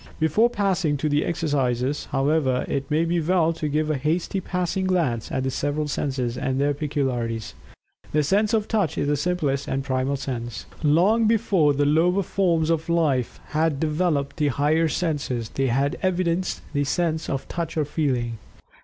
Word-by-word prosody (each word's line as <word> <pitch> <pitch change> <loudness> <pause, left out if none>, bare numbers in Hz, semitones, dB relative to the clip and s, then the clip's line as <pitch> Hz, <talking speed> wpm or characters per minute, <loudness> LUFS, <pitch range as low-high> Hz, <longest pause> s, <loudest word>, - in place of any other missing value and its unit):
Before 160 +10 +3
passing 190 -9 0
to 155 - -1
the 150 0 +2
exercises, 140 -4 -1
however, 135 -2 +1
it 135 0 -2
may 155 +2 +2
be 170 0 0
well 165 0 +2
to 160 -2 -3
give 155 +1 0
a 150 - 0
hasty 165 +6 -1
passing 180 +1 -2
glance 160 -12 0
at 130 - -1
the 130 - -1
several 145 +3 -1
senses, 130 -4 -2
and 135 -1 -1
their 145 +1 +2
peculiarities. 130 -6 -2 0.6
The 150 0 +2
sense 205 +8 +2
of 215 -1 0
Touch 200 -9 0
is - - 0
the 145 - +2
simplest 145 -3 -1
and 135 0 -1
primal 130 +1 0
sense. 120 -4 -5 0.2
Long 185 +9 +4
before 200 -9 +3
the 145 +1 +2
lower 175 +6 +3
forms 170 -4 +1
of 165 0 -1
life 150 -8 +1
had 155 -2 +1
developed 155 -2 0
the 150 - +2
higher 150 +4 +2
senses, 145 -9 -2
they 135 0 -1
had 135 +4 0
evidenced 185 -1 0
the 145 -1 +1
sense 160 +2 -1
of 135 - -3
Touch 165 -1 -4
or 155 - +2
Feeling. 125 -7 -1
150 Hz, 170 wpm, -24 LUFS, 135-170 Hz, 0.6 s, Long